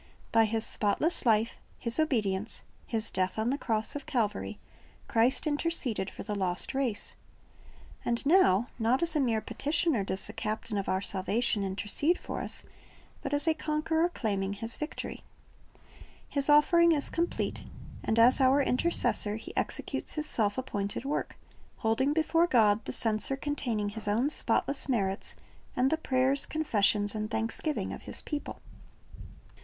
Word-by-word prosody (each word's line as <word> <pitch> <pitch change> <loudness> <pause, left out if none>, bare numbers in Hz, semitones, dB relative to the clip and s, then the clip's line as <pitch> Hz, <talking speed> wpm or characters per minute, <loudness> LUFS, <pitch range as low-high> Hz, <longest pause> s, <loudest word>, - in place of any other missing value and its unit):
"' - - -28
By 225 0 +5
His 220 +1 -1
spotless 245 - +1
life. 225 +1 +2 0.2
His 235 +3 0
obedience, 215 -9 0 0.2
His 225 -1 -2
death 185 +1 -1
on 220 +3 0
the 280 - 0
cross 220 +1 -2
of 290 - -6
Calvary, 205 - -1 0.5
Christ 235 +7 +2
interceded 290 - -1
for - - -9
the 210 - -4
lost 185 -3 -1
race. 260 -6 -1 0.9
And 235 +3 -2
now, 275 - +4
not 240 +6 +2
as 335 -1 +1
a - - +3
mere 230 -5 +1
petitioner 295 - 0
docs 190 0 -2
the - - -6
Captain 215 0 -4
of 200 -2 -2
our 190 +1 0
salvation 205 +3 +1
intercede 205 - 0
for - - -5
us, - - -2 0.6
but - - -4
as 290 +3 0
a 320 - +5
Conqueror 320 +2 0
claiming 200 - -2
His 225 +3 0
victory. 300 - -6 1.1
His 280 0 0
offering 335 +3 +6
is 290 -2 +2
complete, 340 +1 -2 0.4
and 220 - 0
as 245 +4 +6
our 265 +2 +5
Intercessor 250 -7 +2
He 220 - -9
executes - - -2
His 305 -1 -3
self 210 -8 +1
appointed 210 -3 -3
work, 290 +2 -3 0.4
holding 230 +5 +1
before 330 +2 +2
God 220 -6 +3
the - - -3
censer 220 +4 +1
containing 245 -8 -2
His 215 +1 -1
own 235 +8 +1
spotless 275 -2 +1
merits 195 -6 -1 0.4
and 255 +2 +2
the 320 - +2
prayers, 265 -2 +1
confessions, 205 -9 +2
and 215 -1 -3
thanksgiving 225 +7 -2
of - - -8
His - - -1
people. 295 -2 -5
235 Hz, 155 wpm, -29 LUFS, 210-290 Hz, 1.1 s, offering